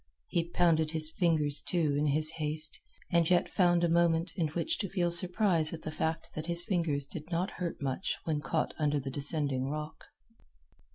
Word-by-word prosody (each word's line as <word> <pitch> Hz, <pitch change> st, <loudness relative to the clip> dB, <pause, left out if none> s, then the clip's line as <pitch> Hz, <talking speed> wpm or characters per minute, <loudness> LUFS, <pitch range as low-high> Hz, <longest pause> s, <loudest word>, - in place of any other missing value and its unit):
He 170 Hz, 0 st, -1 dB
pounded 165 Hz, -3 st, +2 dB
his 155 Hz, 0 st, 0 dB
fingers, 155 Hz, -5 st, +1 dB
too, 160 Hz, -6 st, 0 dB
in 150 Hz, +1 st, +1 dB
his 155 Hz, +2 st, +3 dB
haste, 155 Hz, 0 st, 0 dB, 0.3 s
and 170 Hz, -1 st, +3 dB
yet 175 Hz, -1 st, +3 dB
found 175 Hz, -2 st, +2 dB
a -, -, +4 dB
moment 170 Hz, 0 st, +2 dB
in 165 Hz, -3 st, 0 dB
which 175 Hz, -, -2 dB
to 200 Hz, -, -2 dB
feel 175 Hz, -2 st, 0 dB
surprise 175 Hz, -2 st, +3 dB
at 160 Hz, -, -13 dB
the 155 Hz, -, -4 dB
fact 160 Hz, +1 st, -3 dB
that 155 Hz, +1 st, -5 dB
his 170 Hz, 0 st, +2 dB
fingers 165 Hz, -7 st, 0 dB
did 150 Hz, +3 st, -9 dB
not 175 Hz, +3 st, -1 dB
hurt 170 Hz, -2 st, -3 dB
much 135 Hz, +7 st, -2 dB
when 155 Hz, -2 st, -2 dB
caught 160 Hz, +1 st, -1 dB
under 150 Hz, -1 st, +1 dB
the 135 Hz, 0 st, -5 dB
descending 140 Hz, -2 st, +1 dB
rock. 150 Hz, +1 st, -6 dB
160 Hz, 185 wpm, -30 LUFS, 150-170 Hz, 0.3 s, a